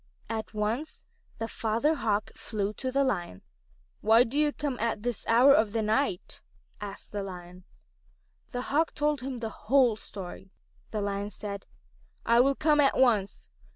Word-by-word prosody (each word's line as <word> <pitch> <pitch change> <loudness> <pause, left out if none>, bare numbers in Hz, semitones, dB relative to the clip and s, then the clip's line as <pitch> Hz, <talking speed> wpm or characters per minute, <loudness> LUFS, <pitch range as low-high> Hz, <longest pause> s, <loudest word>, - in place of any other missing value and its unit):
At 220 -1 -4
once 225 +9 -2 0.3
the 225 - -3
Father 230 +8 0
Hawk 215 -8 -1
flew 210 -1 -3
to 260 +3 -4
the 275 +1 +2
Lion. 175 - -2 0.6
"Why 225 +3 +6
do 255 +5 -2
you 300 -1 +3
come 285 -4 -3
at 225 -2 -1
this 245 -2 -3
hour 250 +5 +7
of 215 -5 +3
the 225 -1 0
night?" 215 -3 -1 0.4
asked 200 -1 -8
the 205 - -3
Lion. 180 -1 -9 0.9
The 245 - -3
Hawk 320 +3 +2
told 295 -2 0
him 260 0 -4
the 230 -2 -4 0.2
whole 255 -3 +5
story. 195 -2 -8 0.4
The 215 - -3
Lion 200 0 -2
said: 200 -2 -7 0.6
"I 235 +1 +5
will 275 +2 +4
come 300 0 +3
at 280 -2 +4
once. 220 -7 +2
225 Hz, 160 wpm, -28 LUFS, 205-270 Hz, 0.9 s, hour